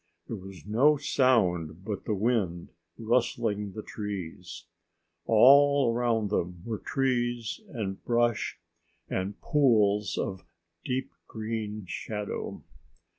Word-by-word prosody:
There - - -4
was 95 -3 -11
no 135 +9 +4
sound 95 - +1
but 105 -2 -4
the 105 - 0
wind 100 -6 0 0.3
rustling 115 -3 0
the 110 - -6
trees. 95 -4 -6 0.6
All 140 +2 +6
around 115 -3 0
them 90 -3 -2
were 110 -2 -3
trees 120 - -1
and 105 - -4
brush 120 -1 +1 0.5
and 95 +2 -3
pools 105 - +3
of 95 -1 -3 0.4
deep 130 +1 -2 0.2
green 110 -2 -4
shadow. 105 +3 -5
110 Hz, 105 wpm, -28 LUFS, 100-120 Hz, 0.6 s, All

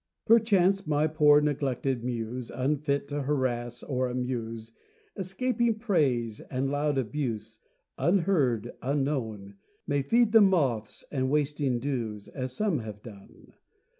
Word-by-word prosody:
Perchance, 200 -5 +4
my 150 0 +2
poor 150 -2 +5
neglected 135 -4 -1
Muse 120 0 -4
Unfit 140 +1 -1
to 145 0 -2
harass 120 -4 -2
or 130 -2 -1
amuse, 115 -3 -4 0.4
Escaping 225 +4 0
praise 135 - 0
and 135 +1 -3
loud 145 0 0
abuse, 115 -4 -3 0.4
Unheard, 165 - +2
unknown, 125 -8 -2 0.3
May 145 -1 0
feed 230 - +3
the 225 0 +7
moths 140 - +1
and 130 -2 0
wasting 145 -3 +1
dews, 115 -6 -3
As 130 -2 -5
some 190 +1 0
have 105 -2 -8
done. 100 -4 -14
135 Hz, 120 wpm, -28 LUFS, 120-155 Hz, 0.4 s, the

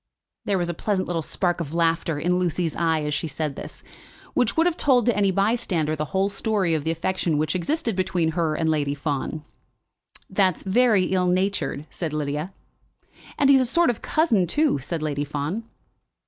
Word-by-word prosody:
There 200 - +1
was 175 -1 -1
a 175 - -2
pleasant 190 +2 -1
little 170 -2 -1
spark 175 +2 -1
of 160 0 -5
laughter 165 -2 +1
in 175 +4 +1
Lucy's 175 -2 -1
eye 160 -2 +1
as 150 0 -2
she 145 +3 -1
said 150 -1 -2
this, - - -9 0.5
which 245 +2 +1
would 325 - +4
have 350 -2 +2
told 255 -8 +3
to 240 - +2
any 200 -1 +3
bystander 190 -6 0
the 150 0 -2
whole 190 +6 0
story 200 -4 0
of 155 -2 0
the 160 - -2
affection 165 -1 -1
which 155 +1 0
existed 235 - -1
between 180 -3 0
her 160 -2 0
and 160 +1 -1
Lady 145 -3 0
Fawn. 145 +1 -3 0.8
"That's 190 -3 +1
very 215 0 +3
ill 185 0 +1
natured," 180 -6 0
said 160 -4 -4
Lydia. 150 +3 -2 0.9
"And 280 -1 +5
he's 265 -1 +6
a - - +2
sort 340 +1 +3
of 230 - -9
cousin, 230 - +2
too," 295 - +2
said 155 +4 -4
Lady 145 -2 -1
Fawn. 150 +9 -3
175 Hz, 190 wpm, -24 LUFS, 155-200 Hz, 0.9 s, he's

